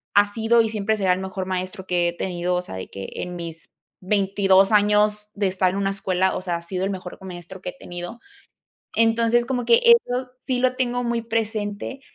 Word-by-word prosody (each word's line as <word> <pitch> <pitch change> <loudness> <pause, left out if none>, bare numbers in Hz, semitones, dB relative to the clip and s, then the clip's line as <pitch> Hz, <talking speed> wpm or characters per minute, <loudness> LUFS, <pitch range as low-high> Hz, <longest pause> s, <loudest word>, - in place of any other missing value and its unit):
ha 205 0 +4
sido 230 +1 +4
y 225 - 0
siempre 215 0 0
será 190 -3 +3
el 180 - -2
mejor 190 0 -4
maestro 185 +1 -4
que 175 -1 +2
he - - -5
tenido, 180 0 -2
o 180 - 0
sea, 135 - -8
de 95 - -6
que 95 0 -7
en 180 0 -5
mis 165 -2 -8 0.3
22 195 0 +3
años 210 0 +3
de 200 -1 0
estar 185 0 +2
en 190 - -4
una 195 0 0
escuela, 190 -1 0
o - - -3
sea, 175 -2 -2
ha - - -9
sido 185 +2 -3
el - - -1
mejor 185 -2 -7
maestro 180 0 -9
que 180 - -4
he - - -11
tenido. 175 +6 -7 0.8
Entonces, 230 +1 +3
como 245 -1 -2
que 465 - +5
eso 260 - +4 0.2
sí 255 -1 +1
lo 255 0 +2
tengo 245 -1 0
muy 235 -1 0
presente 220 +2 -3
200 Hz, 210 wpm, -23 LUFS, 185-225 Hz, 0.8 s, que